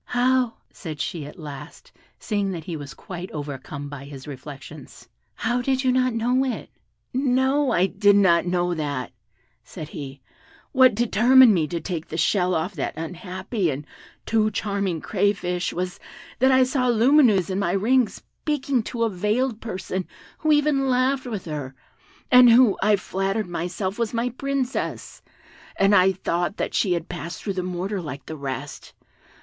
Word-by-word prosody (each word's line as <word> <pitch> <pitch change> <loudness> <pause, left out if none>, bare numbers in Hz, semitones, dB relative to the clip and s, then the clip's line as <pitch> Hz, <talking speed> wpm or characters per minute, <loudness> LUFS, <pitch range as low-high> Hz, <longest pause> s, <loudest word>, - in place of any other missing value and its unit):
"How," 250 -1 +1 0.2
said 155 -6 -8
she, 150 0 -3
at 150 - -12
last, 150 - -10 0.3
seeing 205 -2 -1
that 165 -3 -6
he 170 +1 -5
was 145 -2 -8
quite 180 0 -8
overcome 145 -1 -6
by 140 -1 -8
his 140 -1 -10
reflections, 140 +1 -10 0.3
"how, 240 +2 -1
you 260 +2 +1
did 260 -1 +1
not 255 -2 +2
know 245 +3 +2
it?" 260 -3 -4 0.4
"No, 265 +2 +2
I 180 - +3
did 205 +1 +3
not 180 -4 +4
know 175 0 +1
that," 145 -6 -3 0.5
said 155 - -9
he; 140 -2 -8 0.5
"what 260 -4 +5
determined 240 +1 +6
me 160 -5 +1
to 170 +2 -3
take 165 -3 -5
the 160 - -5
shell 180 +2 +2
off 170 +5 -1
that 150 -3 -4
unhappy 180 +4 -3
and 145 +1 -4 0.4
too 220 -1 +2
charming 200 -5 -2
crayfish 185 -3 0
was, 180 +2 -4 0.4
that 260 +2 +5
I 260 0 +6
saw 255 0 0
Lumineuse 235 - +4
in 190 - -1
my 180 -3 0
ring 230 +4 +3
speaking 280 -4 -2
to 235 -2 -2
a 230 - +2
veiled 215 +5 -1
person 185 -3 -4 0.3
who 310 - +1
even 295 -2 +3
laughed 260 +1 +1
with 215 -6 -5
her, 145 -5 -5 0.6
and 250 -1 +9
who, 235 -2 +6
I 210 +1 +4
flattered 195 +2 -2
myself, 180 +4 -3
was 230 0 -1
my 235 +2 0
Princess; 270 +1 -3 0.5
and 195 +1 +3
I 190 -1 +6
thought 175 +1 -2
that - - -2
she 190 -4 +2
had 170 -2 -3
passed 170 -1 -6
through 200 - -2
the 185 - -2
mortar 185 +2 -3
like 140 -4 -7
the 160 - -6
rest. 140 0 -6
195 Hz, 165 wpm, -24 LUFS, 170-245 Hz, 0.6 s, and